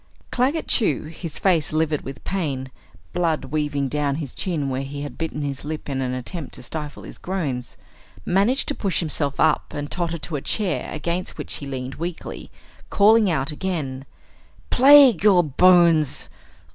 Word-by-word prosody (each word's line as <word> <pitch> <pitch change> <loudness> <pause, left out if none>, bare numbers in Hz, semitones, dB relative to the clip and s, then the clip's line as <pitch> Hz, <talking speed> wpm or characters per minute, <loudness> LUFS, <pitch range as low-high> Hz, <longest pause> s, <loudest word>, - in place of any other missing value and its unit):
Claggett 270 +6 0
Chew, 200 - +2
his 160 0 -8
face 170 -6 +2
livid 155 -1 0
with 135 -3 -9
pain, 140 -9 -3 0.4
blood 160 -5 0
weaving 145 0 -1
down 145 0 -1
his 145 -4 -5
chin 160 -7 -2
where 130 0 -2
he 140 +1 -6
had 145 - -7
bitten 160 -2 -4
his 140 -2 -4
lip 155 +1 -5
in 135 -2 -2
an 130 -1 -1
attempt 145 +4 -6
to - - -10
stifle 150 +2 -6
his - - -11
groans, 145 -10 -4 0.5
managed 205 +9 +2
to - - +1
push 195 -8 -1
himself 145 -4 -1
up 160 -1 +2
and 145 0 -5
totter 170 -1 -2
to 155 0 -5
a - - -6
chair 205 +3 -1
against 170 +4 -3
which - - -3
he 140 - -7
leaned 130 -1 -5
weakly, 175 0 -6 0.4
calling 215 0 +5
out 145 -3 -1
again: 150 -6 -3 0.7
"Plague 265 - +7
your 190 -4 +6
bones! 165 -1 +4
155 Hz, 165 wpm, -23 LUFS, 140-180 Hz, 0.7 s, Plague